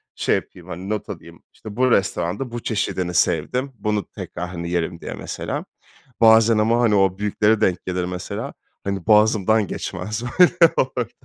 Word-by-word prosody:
şey - - +1
yapayım, - - -7
hani, 95 +4 -7
not 110 -1 -3
alayım, - - -10
işte 105 -1 -10
bu 130 0 +2
restoranda 100 +5 0
bu 120 - -4
çeşidini 95 -5 -2
sevdim, 125 - 0
bunu 105 -2 -1
tekrar, 90 +1 -6
hani, 85 -1 -5
yerim 85 0 -2
diye - - -6
mesela. - - -5 0.6
Bazen 110 0 +6
ama 115 +3 +2
hani, 110 -3 +3
o 95 -1 +2
büyükleri 105 +1 +1
denk 90 -4 +1
gelir 90 -1 -2
mesela, 90 0 -5 0.3
hani, 100 -1 -4
boğazımdan 110 -1 +4
geçmez 105 +6 -5 0.2
böyle 175 -2 +6
orada. 125 -3 0
105 Hz, 160 wpm, -21 LUFS, 90-115 Hz, 0.6 s, Bazen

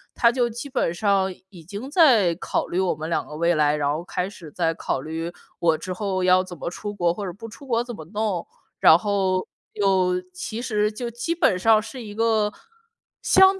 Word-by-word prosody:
他 235 - +5
就 240 -1 +1
基 235 +4 -6
本 255 -11 0
上， 195 0 +1 0.2
已 180 -5 -13
经 205 - -7
在 250 - +5
考 - - -2
虑 180 - -2
我 190 -3 +1
们 155 +1 -5
两 165 - 0
个 150 - -8
未 170 +2 +2
来， 150 -1 +3
然 145 -1 0
后 160 +3 -4
开 180 0 -2
始 175 -6 -11
在 165 +1 0
考 160 - -2
虑 160 +4 -4 0.3
“我 165 -2 +3
之 185 +4 -5
后 190 -1 -2
要 185 0 +5
怎 180 -2 -9
么 170 - -4
出 205 +3 -5
国， 175 -4 +1
或 205 - -6
者 - - -3
不 225 +5 -9
出 250 +5 -13
国 235 -2 +1
怎 240 -1 -7
么 155 - -9
弄”， 205 -1 -2 0.3
然 160 - +8
后， 190 -2 0 0.3
又 185 -2 +2
其 215 +5 -5
实 210 -3 0
就 235 +2 -5
基 240 +8 -2
本 320 - +2
上 215 +3 +4
是 255 +4 -8
一 205 -2 -8
个 220 -1 +2 0.7
相 385 0 +6
195 Hz, 230 characters per minute, -24 LUFS, 175-225 Hz, 0.7 s, 然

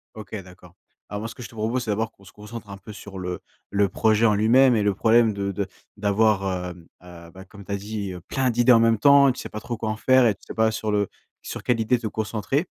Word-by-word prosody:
OK, 110 0 -8
d'accord. 90 -1 -16 0.3
Alors 105 +1 -5
moi, 110 - -4
ce 115 - -10
que - - -11
je 115 - -8
te 115 - -16
propose, 115 +4 -1
c'est 110 - -2
d'abord 110 +2 -1
qu'on 100 - -23
se 100 - -15
concentre 105 +1 -10
un 100 - -8
peu 100 +2 -11
sur 100 -1 -10
le 90 -1 -4 0.3
le 100 -1 +2
projet 110 +3 +2
en 105 -2 +4
lui-même 120 +5 +5
et 105 - +1
le 100 -1 +2
problème 115 +2 +3
de 100 0 -2
de 100 0 -3 0.3
d'avoir, 100 -3 +1
hem, 85 -2 -14 0.2
heu, 85 -1 -13
bah, 95 0 -12
comme 100 +1 -14
tu - - -8
as 100 - 0
dit 100 -1 -5
heu, 90 - -9
plein 130 -2 0
d'idées 120 +2 +4
en 115 - +7
même 115 0 +3
temps. 140 +1 +6
Tu - - -7
sais - - -7
pas 105 - -6
trop 120 +1 -5
quoi 110 0 -3
en 110 - -1
faire 130 +2 +4
et 105 - +1
tu - - -38
sais - - -7
pas 110 0 +2
sur 110 -1 -3
le 105 -1 +1 0.3
sur - - -7
quelle 120 -2 +1
idée 115 +3 +2
te 115 - -4
concentrer 110 - -2
110 Hz, 275 wpm, -24 LUFS, 100-115 Hz, 0.3 s, en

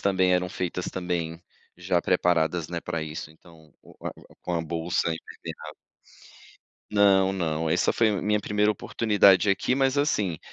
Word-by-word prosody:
também 95 -2 +2
eram 90 0 0
feitas 90 0 -4
também 85 -2 -3 0.3
já 90 -1 0
preparadas, 85 -2 +1
né, 85 -1 -4
para 80 - -3
isso, 80 0 -7
então, 80 -1 -19
o - - -17
o - - -5 0.2
o - - -20
com 90 - -3
a 85 - 0
bolsa 85 +1 -1
impermeável. 80 0 -8 1.2
Não, 100 -2 +4
não, 80 -4 -2
essa - - +2
foi 115 -1 +3
a 100 -3 -1
minha 105 0 +1
primeira 105 +1 +1
oportunidade 105 -1 +3
aqui, 100 +6 +1
mas 135 0 +2
assim, 105 - 0
90 Hz, 160 wpm, -26 LUFS, 80-100 Hz, 1.2 s, Não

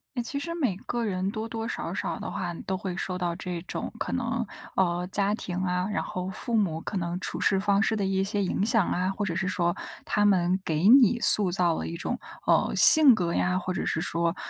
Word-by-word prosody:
哎， 240 - -2
其 280 +4 -4
实 335 +3 -5
每 255 - -1
个 240 -1 -2
人 185 -1 -2
多 220 +2 -5
多 225 0 -5
少 - - -5
少 - - -4
的 - - -7
话， 175 -1 -4
都 190 - -2
会 185 -2 -5
受 185 -1 -4
到 175 -2 -3
这 175 -1 -6
种 180 - -6
可 - - -4
能， 235 -2 -2 0.3
呃， 180 -1 0
家 200 +1 +1
庭 180 -5 -6
啊， 180 0 -1
然 - - -1
后 180 0 -5
父 230 +4 -3
母 175 -7 0
可 200 - -5
能 175 0 -3
处 - - -5
事 195 - +1
方 200 0 +1
式 220 - 0
的 205 - -2
一 190 0 0
些 200 +1 -2
影 190 +1 -1
响 225 -4 +2
啊， 185 +1 -1
或 205 - -3
者 180 -5 -3
是 190 +2 -2
说 175 -3 -1 0.3
他 205 -1 0
们 185 -2 +2
给 160 +3 0
你 240 -1 +6
塑 200 -4 +2
造 175 -2 +1
了 - - -4
一 165 - -6
种， - - -4 0.3
呃， - - +2
性 305 -5 +10
格 175 -5 -2
呀， 180 0 0
或 185 0 -5
者 185 - -3
是 160 - -2
说， 170 0 -1
190 Hz, 255 characters per minute, -26 LUFS, 180-215 Hz, 0.3 s, 性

